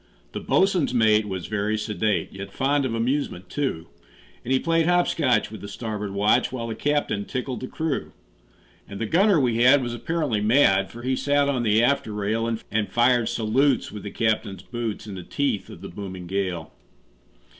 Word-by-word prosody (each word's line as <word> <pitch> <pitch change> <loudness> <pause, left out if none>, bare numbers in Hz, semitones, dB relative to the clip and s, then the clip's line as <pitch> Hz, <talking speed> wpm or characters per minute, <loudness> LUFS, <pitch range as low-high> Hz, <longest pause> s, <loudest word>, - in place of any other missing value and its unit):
The - - -4
boatswain's 185 -9 +2
mate 110 -2 +4
was 95 -3 -4
very 105 +1 -1
sedate, 105 -1 -1
Yet 95 0 -7
fond 140 +3 +1
of 115 -3 -2
amusement, 115 -6 -2
too; 135 - -2 0.6
And 125 - -4
he 130 - +5
played 165 +3 +1
hop 175 0 +3
scotch 125 -10 +1
with 110 - -9
the 100 - -7
starboard 105 -1 -5
watch, 105 +5 +2
While 115 -3 -4
the - - -2
captain 145 -5 0
tickled 130 -1 -4
the 130 - -5
crew. 160 -1 -3 0.8
And 100 - -7
the 115 - -1
gunner 190 - +4
we 120 -4 +1
had 130 +3 +5
was 120 -1 -3
apparently 120 -2 -1
mad, 105 -4 +4
For 120 +1 -10
he 130 +1 0
sat 145 +1 +2
on 135 -3 0
the 110 0 +3
after 140 -3 +1
rail, 105 +3 -1 0.2
And 105 0 -1
fired 120 0 +3
salutes 125 +5 +1
with 105 - -7
the 100 - -6
captain's 105 -4 -1
boots, 120 -3 -4
In 105 - -7
the 95 - -6
teeth 135 +3 -2
of - - -11
the - - -7
booming 95 -3 -7
gale. 90 -2 -3
115 Hz, 190 wpm, -24 LUFS, 105-135 Hz, 0.8 s, he